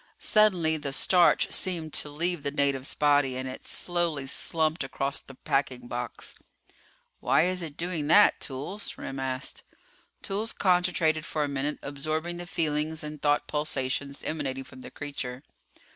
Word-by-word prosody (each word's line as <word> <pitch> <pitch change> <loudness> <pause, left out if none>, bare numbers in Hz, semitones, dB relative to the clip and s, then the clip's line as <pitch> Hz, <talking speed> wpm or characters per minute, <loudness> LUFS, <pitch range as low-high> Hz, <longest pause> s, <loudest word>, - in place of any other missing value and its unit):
Suddenly 180 -7 +4
the 145 -2 -4
starch 175 +4 +4
seemed 165 -5 -2
to 150 - -1
leave 170 +3 -1
the 140 - -1
native's 140 -2 0
body 145 -3 +3
and 130 0 -3
it 130 - -8
slowly 170 -5 0
slumped 155 +3 0
across 135 +1 -2
the 135 - -14
packing 125 -2 -1
box. 120 -1 -5 0.9
"Why - - +4
is 185 0 +1
it 155 -4 -6
doing 165 -4 -2
that, 205 +6 +6
Toolls?" 150 +10 -4
Remm 135 0 -5
asked. 130 -1 -2 0.6
Toolls 210 +4 -2
concentrated 175 -4 +2
for 155 -1 -1
a - - 0
minute, 140 +1 -2
absorbing 155 +4 -3
the 175 0 -7
feelings 155 -1 -1
and 150 -1 -7
thought 145 0 +2
pulsations 140 -2 -2
emanating 135 -4 -3
from 130 0 -13
the - - -8
creature. 135 -3 -5
150 Hz, 150 wpm, -28 LUFS, 135-170 Hz, 0.9 s, that